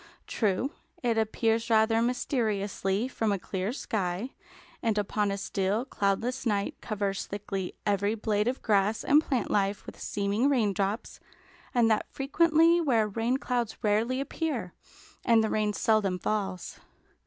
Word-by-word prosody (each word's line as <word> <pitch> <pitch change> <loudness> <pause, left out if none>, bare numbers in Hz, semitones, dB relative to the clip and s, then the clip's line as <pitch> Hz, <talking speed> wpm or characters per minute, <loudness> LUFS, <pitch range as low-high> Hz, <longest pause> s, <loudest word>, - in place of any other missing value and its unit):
True, 215 +5 0 0.3
it 235 -2 +2
appears 225 +1 0
rather 225 0 +4
mysteriously 215 -4 0
from 225 -4 -1
a 200 - +1
clear 190 +2 -3
sky, 205 -2 -2 0.5
and 225 -2 0
upon 210 0 0
a 200 - -2
still, 200 +4 -1
cloudless 230 +4 -1
night 205 -4 0
covers 200 -2 -2
thickly 195 -2 -4
every 205 +1 +1
blade 210 -1 0
of 255 +2 -2
grass 210 0 +2
and 295 +2 +5
plant 265 -5 -1
life 200 0 0
with - - -10
seeming 205 +6 0
raindrops, 210 -4 0 0.5
and 240 -2 +3
that 215 - +1
frequently 330 +4 +3
where 235 -9 +2
rain 225 +5 0
clouds 245 -4 -2
rarely 225 +5 +1
appear, 275 - -3 0.5
and 230 -2 +4
the 220 - -1
rain 215 -1 +1
seldom 205 -3 +1
falls. 190 -2 -3
215 Hz, 140 wpm, -28 LUFS, 200-245 Hz, 0.5 s, and